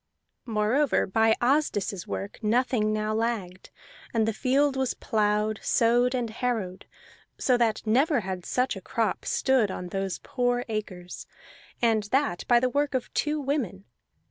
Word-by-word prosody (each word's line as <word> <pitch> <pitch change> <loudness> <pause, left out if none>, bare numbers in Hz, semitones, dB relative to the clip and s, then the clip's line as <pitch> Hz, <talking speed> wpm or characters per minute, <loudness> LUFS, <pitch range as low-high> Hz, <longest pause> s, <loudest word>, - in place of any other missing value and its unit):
Moreover 230 +6 +2
by 220 +3 +3
Asdis's 240 - 0
work 200 +1 -5
nothing 225 -1 +1
now 215 0 -1
lagged, 215 -5 -3 0.5
and 220 -1 +2
the 225 - 0
field 270 +5 +2
was 265 -1 -1
plowed, 210 0 0
sowed, 245 +2 +3
and 240 -3 -2
harrowed, 220 -6 -3 0.5
so 255 - +2
that 230 -2 0
never 260 +5 +3
had 185 -2 -5
such 250 +7 0
a - - -8
crop - - -2
stood 260 -6 +2
on 180 -1 -5
those 195 0 -2
poor 245 -1 0
acres, 190 -5 -6 0.6
and 225 -2 +3
that 260 -5 0
by 240 -1 +5
the 255 - +1
work 285 +2 0
of 255 - -3
two 300 0 0
women. 255 - -2
230 Hz, 145 wpm, -27 LUFS, 210-255 Hz, 0.6 s, by